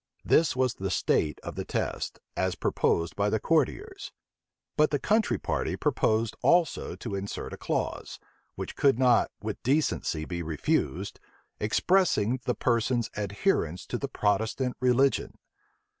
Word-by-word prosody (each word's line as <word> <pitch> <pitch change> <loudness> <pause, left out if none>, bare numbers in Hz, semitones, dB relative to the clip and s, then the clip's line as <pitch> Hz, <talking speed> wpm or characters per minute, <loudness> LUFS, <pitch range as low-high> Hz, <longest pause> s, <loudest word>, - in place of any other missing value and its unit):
This 160 -3 +3
was 130 -2 +1
the 95 -3 -4
state 75 -4 +1
of - - -5
the - - -4
test, - - -3 0.2
as 95 -1 0
proposed 85 -1 0
by 100 +1 +1
the 110 - +1
courtiers; 385 - -1 0.6
but 150 0 +4
the 145 - +1
country 215 +9 +1
party - - -2
proposed 110 0 +1
also 170 -3 +2
to 115 - -6
insert 100 0 -4
a - - -6
clause, - - -3 0.4
which - - -6
could 135 -4 +3
not 125 -2 +4
with 110 -1 -4
decency 130 - 0
be 85 0 -4
refused, 80 -2 -1 0.4
expressing 130 - +2
the 125 - 0
person's 120 -1 0
adherence 100 - -1
to 120 - -4
the 140 - -2
Protestant 110 +3 0
religion. 130 +2 +2
120 Hz, 140 wpm, -28 LUFS, 100-140 Hz, 0.6 s, but